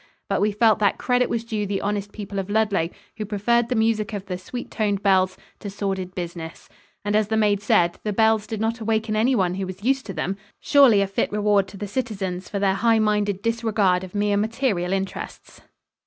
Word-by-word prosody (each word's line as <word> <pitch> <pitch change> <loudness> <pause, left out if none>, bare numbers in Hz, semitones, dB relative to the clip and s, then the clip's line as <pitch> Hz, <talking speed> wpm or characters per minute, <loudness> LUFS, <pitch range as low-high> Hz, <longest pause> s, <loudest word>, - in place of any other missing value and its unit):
But - - 0
we 210 +1 +3
felt 215 +1 +3
that 205 -2 +2
credit 250 0 +1
was 230 -1 -1
due 215 -3 -2
the 195 0 -1
honest 205 0 -2
people 200 -2 -5
of 195 +1 -4
Ludlow, 205 -6 +1 0.3
who 215 - -3
preferred 230 +3 +1
the 250 - 0
music 220 -2 +1
of 200 -2 -4
the 185 -2 -4
sweet 245 +7 -7
toned 205 -3 -1
bells 185 -2 +3 0.2
to 205 - -6
sordid 195 -2 -3
business; 170 -2 -6 0.4
and, 205 0 0
as 215 -1 +3
the 220 +1 0
maid 205 -2 +2
said, 175 -4 +2
the 210 - -2
bells 220 0 +2
did 220 - -4
not 225 +2 -1
awaken 220 -1 -1
anyone 215 -5 +2
who 190 0 -3
was 185 +2 -8
used 265 +1 +1
to 195 - -5
them 185 +5 -2 0.2
surely 270 -8 +5
a - - +2
fit 195 - -1
reward 205 -1 +2
to 195 - -11
the 205 - -4
citizens 195 -6 -3
for 205 - -3
their 195 -1 +2
high 225 +3 +3
minded 210 -2 +1
disregard 220 -5 +1
of 185 +1 -9
mere 205 0 +1
material 215 -4 0
interests. 195 0 -5
205 Hz, 210 wpm, -23 LUFS, 195-220 Hz, 0.4 s, surely